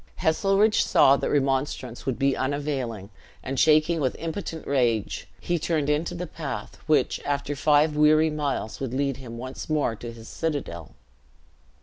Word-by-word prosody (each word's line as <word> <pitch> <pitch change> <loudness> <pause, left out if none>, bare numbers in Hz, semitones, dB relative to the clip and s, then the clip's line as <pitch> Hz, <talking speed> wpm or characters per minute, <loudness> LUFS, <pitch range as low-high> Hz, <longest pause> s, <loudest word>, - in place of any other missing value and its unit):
Heselrigge 195 +6 +3
saw 135 - +5
that - - -2
remonstrance 135 -3 -1
would 130 - 0
be 135 -1 +2
unavailing; 130 -7 -3 0.3
and 135 0 -3
shaking 155 +2 +4
with 130 -4 0
impotent 165 -1 -5
rage, 120 -6 0
he 175 -1 -1
turned 155 -2 0
into 150 +4 -1
the 175 +1 -4
path 155 -3 -6
which, 155 -1 +2
after 145 0 -2
five 150 +2 +3
weary 155 +1 +4
miles, 145 -7 -3
would 130 -2 -3
lead 135 -1 0
him 120 -3 -9
once 130 +5 -7
more 150 -7 +1
to 120 +1 -7
his 115 -1 -12
citadel. 145 - -4
145 Hz, 150 wpm, -25 LUFS, 130-155 Hz, 0.3 s, saw